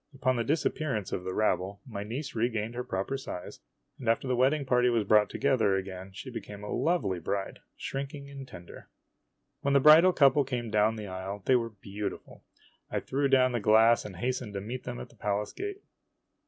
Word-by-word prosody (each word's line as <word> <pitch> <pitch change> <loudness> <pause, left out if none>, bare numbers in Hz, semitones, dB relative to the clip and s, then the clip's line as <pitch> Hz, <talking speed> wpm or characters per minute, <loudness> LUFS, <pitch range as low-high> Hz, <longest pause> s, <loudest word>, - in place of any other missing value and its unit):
Upon 130 -1 +1
the 120 - 0
disappearance 145 - -1
of 90 - -3
the 95 0 -4
rabble, 100 -1 0
my 105 -5 -5
niece 125 +7 -5
regained 115 -1 -1
her 125 +1 -3
proper 100 +6 -2
size; 90 -9 -7 0.4
and 120 - -2
after 115 +3 +1
the 130 - +1
wedding 135 +4 +2
party 125 -1 +3
was 115 -3 +2
brought 105 0 +4
together 130 -8 +2
again, 95 0 -5
she 115 +7 -8
became 105 -3 -8
a 105 - -4
lovely 160 - 0
bride, 95 +4 -3 0.2
shrinking 140 +1 -5
and 140 -1 -9
tender. 85 -6 -12 0.7
When 140 0 +1
the - - +7
bridal 155 +6 +8
couple 140 -3 +5
came 120 -4 -4
down 105 +1 +3
the 105 -1 -6
aisle, 95 +1 -6
they 130 - +5
were 115 -2 +1
beau 100 -1 -5
tiful. - - -13 0.5
I - - -1
threw 140 +1 0
down 130 -1 +4
the 120 - 0
glass 110 +2 +5
and 100 -3 -8
hastened 125 +1 -3
to - - -1
meet 120 +5 -6
them 125 -1 -5
at - - -8
the - - -20
palace 105 -1 -2
gate. 405 0 -6
120 Hz, 200 wpm, -29 LUFS, 100-135 Hz, 0.7 s, bridal